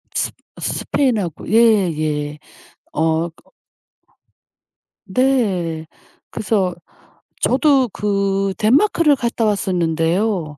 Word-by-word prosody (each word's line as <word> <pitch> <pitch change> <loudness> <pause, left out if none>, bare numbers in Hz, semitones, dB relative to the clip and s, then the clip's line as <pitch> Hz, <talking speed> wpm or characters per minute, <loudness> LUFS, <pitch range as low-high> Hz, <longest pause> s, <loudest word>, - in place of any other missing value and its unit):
스 - - 0 0.3
스페인하고 215 - -1
예예예. 155 -10 +2 0.6
어 160 +2 0 1.8
네. 190 -9 0 0.5
그래서 190 -4 -1 0.7
저도 270 -2 +3
그 195 -1 -1
덴마크를 295 - +3
갔다 235 -3 -1
왔었는데요. 175 -3 0
195 Hz, 160 characters per minute, -19 LUFS, 165-230 Hz, 1.8 s, 저도